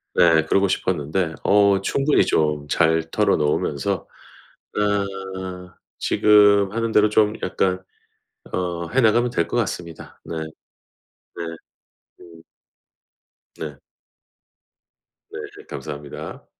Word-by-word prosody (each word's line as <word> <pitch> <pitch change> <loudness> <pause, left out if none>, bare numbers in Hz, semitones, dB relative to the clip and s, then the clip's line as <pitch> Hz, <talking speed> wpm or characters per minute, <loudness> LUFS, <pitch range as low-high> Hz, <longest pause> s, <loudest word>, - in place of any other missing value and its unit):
네 80 -2 +5
그러고 95 +4 +2
싶었는데 85 -2 -1
어 100 -1 +4
충분히 140 +8 +2
좀 75 -2 0
잘 80 +1 +2
털어 105 +5 +2
놓으면서 75 -2 -1 0.7
아 95 -3 -3 0.2
지금 105 -2 +4
하는 115 0 -1
대로 105 0 +4
좀 105 0 +3
약간 95 0 -1 0.7
어 85 -2 -2
해 135 - +2
나가면 120 +1 +3
될 120 - -1
것 - - -3
같습니다. 90 -7 -4
네. 85 - -5 0.8
네. 85 -1 -8 0.6
음. 85 -2 -15 1.2
네. 75 -3 -6 1.5
네. - - -7 0.2
그 - - -13
감사합니다. 75 -1 -8
95 Hz, 190 characters per minute, -22 LUFS, 80-105 Hz, 1.5 s, 네